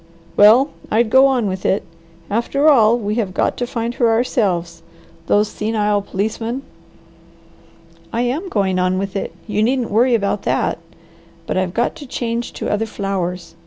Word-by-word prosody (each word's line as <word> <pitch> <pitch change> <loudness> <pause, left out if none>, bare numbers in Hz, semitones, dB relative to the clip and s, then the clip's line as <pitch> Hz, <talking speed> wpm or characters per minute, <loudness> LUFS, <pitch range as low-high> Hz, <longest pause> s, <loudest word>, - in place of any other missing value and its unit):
"Well 230 +8 +6 0.2
I'd 220 0 +1
go 265 +1 +7
on 255 -4 +1
with 190 -1 -3
it. 195 - +1 0.4
After 235 +7 0
all 235 -6 +5
we 210 -3 -2
have 185 -4 -5
got - - +1
to 245 - -2
find 235 0 -3
her 240 -1 +2
ourselves. 185 -8 0 0.5
Those 210 +1 +3
senile 210 -1 0
policemen!" 225 +6 -3 1.5
"I 230 - -1
am 295 +10 -2
going 190 - 0
on 185 0 +1
with 195 0 -3
it; 195 - -3
you 210 -1 -1
needn't 245 +1 0
worry 240 +3 +4
about 200 -2 -1
that. - - 0 0.7
But - - -3
I've 185 -1 -1
got 235 - +1
to 290 -4 -10
change 235 -1 -3
to - - -5
other 220 +2 0
flowers. 185 -5 -4
220 Hz, 160 wpm, -19 LUFS, 200-240 Hz, 1.5 s, go